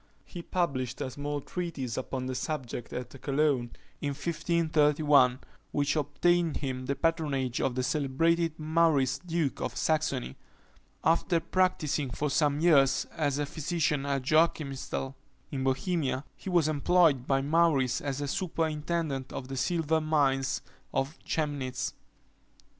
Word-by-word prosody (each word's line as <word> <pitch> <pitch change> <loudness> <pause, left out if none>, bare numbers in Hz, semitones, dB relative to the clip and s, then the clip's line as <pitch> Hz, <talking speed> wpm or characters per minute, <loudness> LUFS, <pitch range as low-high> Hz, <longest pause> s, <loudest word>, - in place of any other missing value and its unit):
He 175 - -8
published 135 -9 -2
a 130 - -3
small 145 +2 -3
treatise 150 -8 -4
upon 130 0 -3
the 130 - -3
subject 125 -4 -4
at 125 -1 -5
Cologne, 140 -3 +1 0.3
in 140 -1 -2
1531, 150 -4 +3 0.3
which 145 +1 +1
obtained 165 +3 +1
him 130 -2 -4
the 140 - 0
patronage 145 -7 0
of 125 - 0
the 130 - 0
celebrated 165 +4 +1
Maurice 155 -4 +2
duke 165 -5 -2
of - - -3
Saxony. 150 - 0 0.7
After 165 +1 +3
practising 160 -6 0
for 145 +3 -2
some 145 0 +2
years 140 -6 +4
as 145 -4 0
a 145 - 0
physician 150 -2 -1
at 140 -2 0
Joachimsthal, 140 -3 +1 0.4
in 135 -2 -2
Bohemia, 135 0 0
he - - -7
was 175 -4 +3
employed 155 -3 +3
by 135 0 +2
Maurice 145 -4 +2
as 145 0 -3
superintendent 160 -5 -2
of 130 - -6
the 135 - -4
silver 160 +2 +1
mines 140 -3 +1 0.3
of 135 +4 -2
Chemnitz. 145 -5 -2
145 Hz, 130 wpm, -29 LUFS, 135-165 Hz, 0.7 s, years